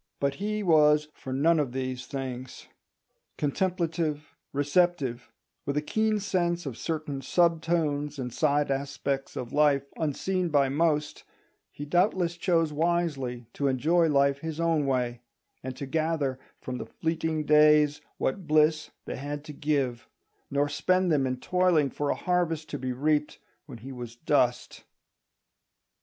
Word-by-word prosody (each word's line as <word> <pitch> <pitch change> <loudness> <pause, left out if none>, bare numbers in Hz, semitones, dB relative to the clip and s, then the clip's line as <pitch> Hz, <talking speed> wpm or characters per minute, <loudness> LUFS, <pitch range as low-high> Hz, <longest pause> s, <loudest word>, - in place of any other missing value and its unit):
But 140 -1 +1
he 210 +1 -1
was 150 -3 +4
for 130 - -9
none 155 +5 +3
of 135 -5 -1
these 130 -1 -4
things. 130 -2 -6 0.7
Contemplative, 160 -1 -1 0.2
receptive, 145 -4 0 0.3
with 140 +1 -2
a - - +2
keen 220 +5 +1
sense 175 -3 -1
of 135 -5 -4
certain 155 -3 -4
sub 170 +3 +2
tones 150 -3 -1
and 125 -3 -4
side 145 -1 +1
aspects 135 0 -2
of 125 0 -5
life 145 -2 +4
unseen 175 +4 -1
by 140 -3 +3
most, 150 0 0 0.5
he 145 - -7
doubtless 175 +1 +1
chose 165 -3 +1
wisely 150 -7 -1
to 140 - -1
enjoy 160 +6 +3
life 140 -1 +3
his 160 +1 -5
own 165 -4 +1
way, 125 -2 -1 0.4
and 130 0 -6
to 140 - -4
gather 150 -2 -1 0.2
from 125 -1 -5
the - - -6
fleeting 160 -1 -2
days 150 -1 +5 0.2
what 170 +6 -2
bliss 155 0 +3 0.2
they - - -5
had 145 +2 -5
to 155 -1 -9
give, 140 -5 -1 0.4
nor 140 +1 +1
spend 185 +5 +1
them 140 -4 +2
in 130 0 -2
toiling 175 -2 +2
for 145 -1 -2
a - - +1
harvest 170 -3 -1
to 145 - -4
be 130 0 -3
reaped 150 +3 0 0.3
when 130 -5 -9
he 130 +5 -9
was 120 -2 -8
dust. 125 -3 0
150 Hz, 150 wpm, -27 LUFS, 135-165 Hz, 0.7 s, days